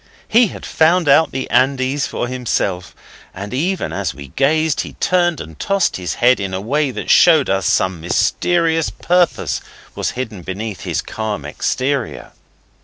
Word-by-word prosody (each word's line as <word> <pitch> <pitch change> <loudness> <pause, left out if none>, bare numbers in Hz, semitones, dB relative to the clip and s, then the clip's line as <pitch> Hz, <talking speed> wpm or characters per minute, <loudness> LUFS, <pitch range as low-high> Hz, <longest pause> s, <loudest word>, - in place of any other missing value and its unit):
He 235 +1 +4
had - - -9
found 165 +1 +2
out 150 +3 +5
his 130 - -3
Andes 135 +1 +1
for - - -3
himself, 110 -7 -2 0.4
and 100 +4 -7
even 180 +8 -1
as - - -3
we 70 -1 -10
gazed 155 - +1
he - - -8
turned 175 -2 +1
and 80 -1 -10
tossed 195 -1 0
his 90 -3 -4
head 125 0 +3
in 95 -2 -3
a - - -2
way 140 +8 0
that 125 - -3
showed 160 - +5
us 95 -1 0
some 95 -3 +1
mysterious 165 - +1
purpose 175 -1 0 0.3
was - - -2
hidden 110 -7 -5
beneath 95 0 -5
his - - -2
calm 105 -9 -4
exterior. 130 - -2
130 Hz, 160 wpm, -18 LUFS, 95-160 Hz, 0.4 s, out